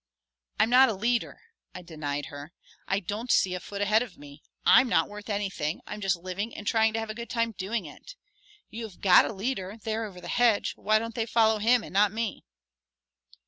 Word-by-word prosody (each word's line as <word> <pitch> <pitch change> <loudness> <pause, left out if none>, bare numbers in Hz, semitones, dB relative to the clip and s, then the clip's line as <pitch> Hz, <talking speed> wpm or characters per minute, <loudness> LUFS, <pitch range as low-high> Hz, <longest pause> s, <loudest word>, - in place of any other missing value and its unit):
"I'm 225 - +3
not 260 +1 +7
a 220 - -2
leader," 235 +4 -1 0.3
I 180 - -8
denied 145 -4 -4
her. 145 +4 -9 0.3
"I 195 +1 0
don't 210 +6 -4
see 185 - +3
a 180 - -3
foot 200 +2 -4
ahead 215 +2 +3
of 230 -8 -7
me. 145 +1 -13 0.2
I'm 260 - +6
not - - +2
worth 210 +1 -10
anything. 190 -6 -2
I'm 210 - -7
just 195 -1 +1
living 185 +5 -5
and 210 - -8
trying 220 0 +2
to 225 - -1
have 225 -1 -4
a - - -5
good 235 +1 -8
time 230 -1 0
doing 200 +1 -3
it. - - -12 0.6
You 225 +1 -6
have 200 -5 -12
got 185 -3 +6
a - - -3
leader, 200 -1 -4
there 220 0 -3
over 190 -4 -10
the - - -10
hedge; 240 -4 +2
why 215 +1 +2
don't 230 +1 -4
they 225 0 -2
follow 220 -1 +3
him 235 +2 +3
and - - -10
not 200 +1 +4
me?" 220 -1 -4
210 Hz, 215 wpm, -27 LUFS, 185-225 Hz, 0.6 s, not